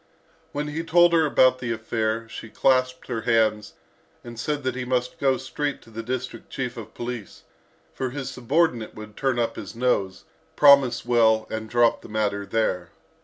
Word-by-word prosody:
When 150 +1 -3
he 160 +3 -3
told 175 +1 +5
her 160 -2 +4
about 130 -2 +4
the 125 -2 -3
affair, 110 0 -2
she 115 0 -9
clasped 130 +1 +1
her 115 -3 -3
hands, 110 -2 +1 0.5
and 120 -1 -9
said 145 +3 -2
that 130 -1 -1
he 125 0 -4
must 125 0 -2
go 135 -2 +2
straight 145 +2 -3
to 115 - -17
the 115 +1 -5
district 130 +2 -5
chief 125 -2 -4
of 115 -3 -10
police, 120 -4 -6 0.5
for 130 - -3
his 135 0 -5
subordinate 125 -1 0
would 105 -1 -10
turn 135 -3 0
up 120 -1 -1
his - - -8
nose, 115 -6 0 0.3
promise 140 -5 +5
well, 110 -2 +3
and 110 0 -4
drop 120 0 +3
the - - -12
matter 105 -2 -1
there. 90 -6 -1
120 Hz, 175 wpm, -24 LUFS, 110-130 Hz, 0.5 s, told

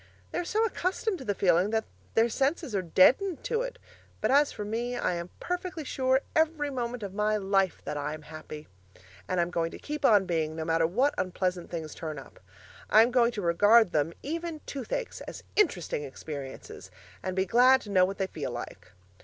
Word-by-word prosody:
They - - -2
are - - -1
so 435 +5 +1
accustomed 380 -1 -1
to 260 - -8
the 205 - -1
feeling 180 +1 +3
that 220 0 0 0.3
their 225 +1 +5
senses 275 +2 -1
are 195 - +1
deadened 270 - +3
to 460 - 0
it; - - -5 0.4
but - - +1
as 285 +1 +4
for 210 - -6
me 235 +3 -2
I - - 0
am 170 0 -4
perfectly 360 -2 -4
sure 260 -1 +1
every 310 -2 +1
moment 245 -3 -3
of 195 -2 -5
my 210 +1 +1
life 195 -2 +1
that 150 - -3
I 150 +1 -3
am 155 - -12
happy. 155 0 -9 0.6
And 185 - 0
I'm 170 0 +1
going 165 -2 0
to - - -9
keep 300 0 -6
on 205 -7 +5
being, 160 -3 -1
no 160 0 -4
matter 165 0 +2
what 255 - +2
unpleasant 180 -1 -2
things 160 -3 -5
turn 155 -2 -6
up. 135 - -12 0.5
I'm 225 +3 +6
going 240 -1 +4
to 205 - -4
regard 205 +5 +5
them 155 +2 0
(even 330 +1 -4
toothaches) 280 - -4
as - - -8
interesting 190 - +1
experiences, 140 -1 -8 0.3
and 185 -1 -3
be 190 0 +1
glad 250 +6 +6
to 205 - -9
know 185 -2 +5
what 195 +2 -1
they 195 - 0
feel 155 -7 -5
like. 120 0 -8
210 Hz, 200 wpm, -28 LUFS, 170-275 Hz, 0.6 s, I'm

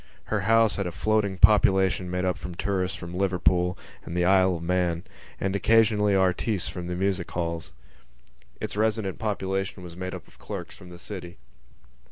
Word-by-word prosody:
Her 105 - +2
house 110 +1 +3
had 100 -3 -1
a - - -3
floating 105 +1 0
population 95 -3 +4
made 90 +1 -1
up 90 -1 -2
of 90 -1 -6
tourists 95 -2 -1
from 85 -1 -8
Liverpool 90 -1 +1 0.3
and 85 - -5
the 90 - +2
Isle 95 -1 +4
of 85 - -6
Man 85 -1 0 0.4
and, 95 0 -1
occasionally, 105 0 +3
artistes 95 +1 +1
from 90 -1 -5
the 90 - -3
music 95 -1 -1
halls. 85 -1 -3 0.9
Its - - -4
resident 110 -2 0
population 95 -3 -2
was 85 -1 -9
made 95 +1 -5
up - - -10
of - - -22
clerks - - -7
from 90 - -13
the 90 - -11
city. 90 -2 -8
95 Hz, 175 wpm, -26 LUFS, 90-100 Hz, 0.9 s, population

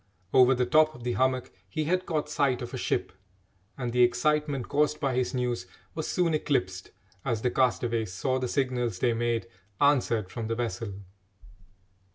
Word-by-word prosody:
Over 130 0 +6
the 125 0 +1
top 155 +4 +4
of 120 - -11
the 125 - -1
hummock 130 0 0 0.2
he 155 - -2
had 180 +4 0
caught 155 -3 -1
sight 140 -4 +1
of 120 - -7
a - - -3
ship, - - -1 0.7
and 125 -3 -3
the 125 - +3
excitement 140 +2 +2
caused 150 +1 +1
by 135 -3 0
his 130 +1 0
news 120 -7 -1 0.3
was 155 - -3
soon 175 -3 +1
eclipsed 95 -12 -1 0.3
as 115 -4 -1
the 125 - +2
castaways 120 -4 +1
saw 130 +7 -1
the 130 - -1
signals 125 -6 -1
they 120 +4 +2
made 115 0 0 0.3
answered 120 -8 +2
from 115 -2 -4
the 115 - -1
vessel. 115 -3 -3
125 Hz, 175 wpm, -28 LUFS, 120-145 Hz, 0.7 s, Over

